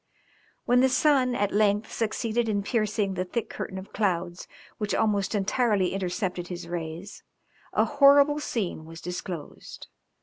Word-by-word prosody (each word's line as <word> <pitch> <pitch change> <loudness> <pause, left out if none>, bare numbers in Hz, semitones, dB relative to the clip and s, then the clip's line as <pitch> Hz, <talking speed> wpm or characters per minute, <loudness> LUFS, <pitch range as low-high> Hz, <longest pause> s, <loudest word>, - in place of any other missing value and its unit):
When 245 +1 +4
the 265 - +4
sun 255 -2 +3
at 205 -1 0
length 210 0 +2
succeeded 225 +1 -1
in 205 -2 0
piercing 210 -3 0
the 185 0 -1
thick 220 +5 -4
curtain 190 - -5
of 190 +1 -9
clouds 180 -4 -1 0.3
which 210 -1 -1
almost 205 -2 +1
entirely 205 -2 +1
intercepted 180 -1 -2
his 175 -1 -7
rays, 170 +3 -6 0.5
a - - +2
horrible 285 +1 +5
scene 200 - -3
was 165 +1 -10
disclosed. 175 -3 -7
205 Hz, 140 wpm, -27 LUFS, 180-235 Hz, 0.5 s, horrible